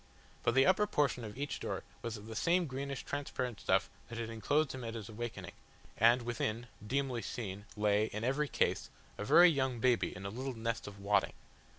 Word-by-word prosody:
But 115 - +1
the 135 0 +6
upper 210 +3 +4
portion 140 - +1
of 105 0 -7
each 145 +1 -3
door - - -3 0.2
was 115 -1 -4
of 105 - -11
the 110 0 -7
same 175 +9 +3
greenish 140 -1 -4
transparent 125 -4 -3
stuff - - +2 0.2
that 115 - -6
had 115 -1 -3
enclosed 145 +7 +1
him 130 -1 -6
at 115 0 -4
his 110 -2 -6
awakening, 115 +1 -5 0.4
and 120 +2 +5
within, 115 -1 -2 0.2
dimly 130 -1 0
seen, 105 -3 -5
lay, 105 0 +3
in 110 0 -5
every 135 +5 +1
case, - - 0 0.3
a - - -2
very 175 +11 +8
young 130 -4 0
baby 125 0 +2
in 95 - -8
a - - -2
little 130 +3 -4
nest 115 -1 -2
of 100 -1 -9
wadding. 100 0 +2
120 Hz, 200 wpm, -34 LUFS, 110-135 Hz, 0.4 s, very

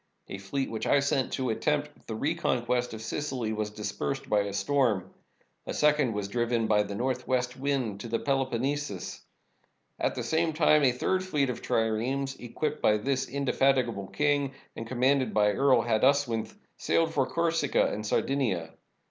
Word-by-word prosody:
A 95 - -6
fleet 130 +8 -3
which 110 - -3
I 145 - +5
sent 140 -1 0
to 130 -3 -1
attempt 150 +5 -2
the 110 - -4
reconquest 125 -4 0
of 110 - -8
Sicily 125 -3 -3
was 105 -1 -2
dispersed 110 +6 -4
by 105 - +3
a 100 0 -1
storm. 110 -4 0 0.5
A - - -3
second 150 -5 +3
was 105 -1 -3
driven 120 +1 0
by 105 -1 +3
the 100 -1 -4
northwest 125 +1 -1
wind 130 -7 -1
to 110 - -6
the 115 0 0
Pelo 135 0 0
ponnesus. 130 -5 -3 0.8
At - - 0
the - - -3
same 160 0 +1
time 150 -1 +4
a 130 - +5
third 185 +9 0
fleet 145 -8 0
of 120 - -7
triremes, 125 +5 0
equipped 150 +5 -3
by 105 - +4
this 130 +4 -1
indefatigable 130 -6 +1
king 145 0 0 0.2
and 115 - -6
commanded 130 0 +1
by 105 -1 +4
Earl 130 +1 +3
Haduswinth, 120 0 +1 0.2
sailed 165 -1 +1
for 135 -4 +1
Corsica 165 -4 +1
and 105 - -4
Sardinia. 105 -8 0
130 Hz, 165 wpm, -28 LUFS, 110-140 Hz, 0.8 s, I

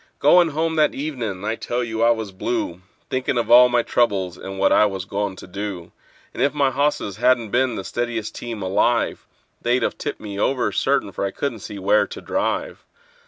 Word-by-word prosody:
Goin' 175 +4 +5
home 160 +1 -1
that 150 -1 +3
evenin' 120 -10 -4
I 110 - 0
tell 120 +2 -2
you 110 -1 -3
I 115 - +5
was 110 -3 0
blue, 95 -3 -3 0.3
Thinkin' 130 0 -1
of 120 - -1
all 125 +1 +9
my 120 -1 +2
troubles, 95 -8 0
and 95 +1 -8
what 95 - +3
I 105 - +5
was 95 -2 -5
goin' 100 0 -2
to - - -11
do; 95 -2 -6 0.4
And - - -5
if 140 +1 +2
my 140 -2 +2
hosses 140 -8 -1
hadn't 120 -2 +2
been 125 -1 +1
the 95 - -4
steadiest 120 -1 -3
team 115 -4 -6
alive, 110 +5 +1 0.3
They'd 120 +2 +1
've - - 0
tipped 145 - -5
me 100 -2 -6
over, 130 +3 +1
certain, 135 -7 +1
for - - -4
I 100 - 0
couldn't 120 +2 -4
see 100 - -8
where 100 +2 +3
to - - -8
drive. - - -2
115 Hz, 205 wpm, -22 LUFS, 100-130 Hz, 0.4 s, all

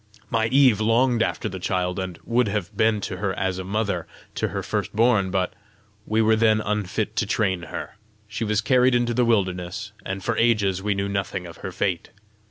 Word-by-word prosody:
My 110 -1 +2
Eve 130 -3 +4
longed 115 +2 +3
after 115 - -1
the 95 -2 -6
child, 90 0 -1
and 95 -3 -4
would 120 0 +2
have 100 -3 -3
been 110 -1 +2
to 95 - -4
her 95 -1 -2
as 95 -1 -1
a - - -4
mother 100 -3 -2 0.3
to - - -1
her - - -4
first - - -3
born, 110 -4 +3
but 90 -1 -1 0.5
we 110 +1 +2
were 110 0 +4
then 110 -1 +3
unfit 105 0 -2
to 105 - +1
train 95 -4 0
her: - - -6 0.3
she 110 +2 -4
was 105 0 +1
carried 125 +1 +4
into 120 0 +1
the 125 +1 +2
wilderness, 100 -2 -1
and 95 0 -4
for 115 - 0
ages 100 -5 +2
we 100 0 0
knew 100 0 -1
nothing 100 -2 -3
of 85 - -10
her 95 - -6
fate. 90 -1 -2
105 Hz, 200 wpm, -24 LUFS, 95-115 Hz, 0.5 s, Eve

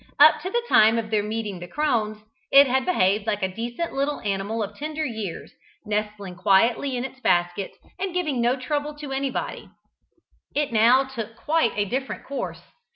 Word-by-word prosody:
Up 300 +2 +7
to 370 - -4
the 475 +4 0
time 220 - +5
of 225 -1 -3
their 215 -1 +2
meeting 210 -2 -4
the 175 - -8
crones, 225 - 0 0.3
it 280 +1 +9
had 265 0 0
behaved 205 - +2
like 210 -2 -1
a 190 0 -1
decent 240 +9 -4
little 280 +2 -1
animal 205 +2 -2
of 205 0 -7
tender 310 +3 -3
years, 220 - -5 0.3
nestling 210 -2 -3
quietly 230 +9 +2
in 245 - -2
its 260 0 -9
basket, 175 -3 0 0.2
and 385 0 -2
giving 310 -8 -1
no 240 +2 +3
trouble 290 +3 -3
to 295 -2 -8
anybody. 270 -1 -3 0.9
It 290 -4 0
now 235 +5 +5
took 230 -4 -7
quite 315 -3 +1
a 205 0 +1
different 265 +6 -4
course. 280 - -5
235 Hz, 175 wpm, -24 LUFS, 210-280 Hz, 0.9 s, it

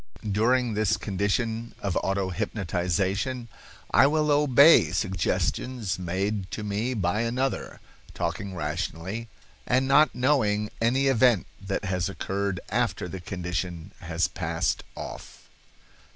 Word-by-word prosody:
During 120 +3 +2
this 105 -1 +1
condition 110 +3 -2
of 100 -3 -2
auto 95 -1 0
hypnotization 100 +5 -1 0.4
I 130 - +6
will 150 0 +2
obey 145 +2 +6
suggestions 95 +4 -1
made 95 +2 -2
to 110 - -5
me 105 +5 -1
by 100 +1 0
another, 125 +3 -2 0.4
talking 95 +3 -3
rationally, 90 +7 -3 0.4
and 130 +2 +2
not 145 +2 +5
knowing 110 -6 +1
any 130 +4 +2
event 125 -7 +4 0.2
that 100 +1 -3
has 90 -1 -1
occurred 100 +1 -2
after 115 -3 0
the 95 +2 -6
condition 90 0 -4
has 85 -1 0
passed - - -2
off." - - -9
105 Hz, 115 wpm, -26 LUFS, 95-125 Hz, 0.4 s, I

